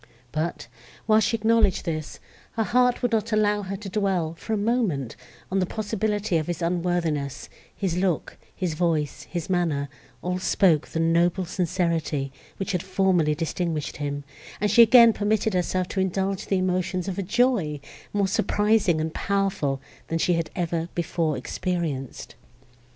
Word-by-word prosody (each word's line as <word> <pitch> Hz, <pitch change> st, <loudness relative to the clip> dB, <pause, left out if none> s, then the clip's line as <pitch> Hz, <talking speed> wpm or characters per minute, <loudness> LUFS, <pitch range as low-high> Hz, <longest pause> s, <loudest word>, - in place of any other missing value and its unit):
But, 155 Hz, -2 st, -3 dB, 0.4 s
while 215 Hz, 0 st, +5 dB
she 225 Hz, +2 st, +1 dB
acknowledged 220 Hz, -4 st, +2 dB
this, 155 Hz, -3 st, -4 dB, 0.3 s
her 225 Hz, -, 0 dB
heart 250 Hz, +4 st, +2 dB
would 245 Hz, -, +2 dB
not 225 Hz, 0 st, 0 dB
allow 210 Hz, -1 st, +2 dB
her 195 Hz, 0 st, -4 dB
to 205 Hz, +1 st, -8 dB
dwell, 190 Hz, -5 st, 0 dB
for 170 Hz, -, -8 dB
a -, -, +1 dB
moment, 200 Hz, -, 0 dB, 0.4 s
on 195 Hz, -, +2 dB
the 185 Hz, -, +1 dB
possibility 210 Hz, -2 st, -1 dB
of 155 Hz, -, -2 dB
his 175 Hz, -2 st, -3 dB
unworthiness; 170 Hz, -5 st, -1 dB, 0.3 s
his 185 Hz, -4 st, -1 dB
look, 180 Hz, -4 st, 0 dB, 0.2 s
his 180 Hz, -4 st, -2 dB
voice, 155 Hz, -3 st, -1 dB
his 175 Hz, -3 st, -4 dB
manner, 165 Hz, -6 st, 0 dB, 0.3 s
all 180 Hz, +1 st, -1 dB
spoke 175 Hz, -4 st, +3 dB
the 165 Hz, -, -4 dB
noble 170 Hz, +3 st, +2 dB
sincerity, 170 Hz, -6 st, -1 dB, 0.3 s
which 195 Hz, -, -3 dB
had 180 Hz, -3 st, 0 dB
formerly 185 Hz, -5 st, +2 dB
distinguished 165 Hz, -1 st, -2 dB
him; 145 Hz, -1 st, -3 dB, 0.4 s
and 210 Hz, -1 st, +1 dB
she 235 Hz, -, +7 dB
again 235 Hz, 0 st, +8 dB
permitted 215 Hz, 0 st, 0 dB
herself 180 Hz, 0 st, 0 dB
to 195 Hz, -, -2 dB
indulge 190 Hz, +1 st, -1 dB
the 195 Hz, -, +1 dB
emotions 185 Hz, 0 st, -1 dB
of 195 Hz, 0 st, -3 dB
a -, -, +1 dB
joy, 200 Hz, -, +1 dB, 0.3 s
more 200 Hz, -1 st, +1 dB
surprising 205 Hz, -3 st, +2 dB
and 160 Hz, 0 st, -2 dB
powerful, 195 Hz, -9 st, 0 dB, 0.3 s
than 165 Hz, -, -1 dB
she 175 Hz, +2 st, +2 dB
had 165 Hz, -1 st, -1 dB
ever 170 Hz, -2 st, -2 dB
before 165 Hz, -3 st, -1 dB
experienced. 155 Hz, -2 st, -3 dB
180 Hz, 155 wpm, -25 LUFS, 165-205 Hz, 0.4 s, again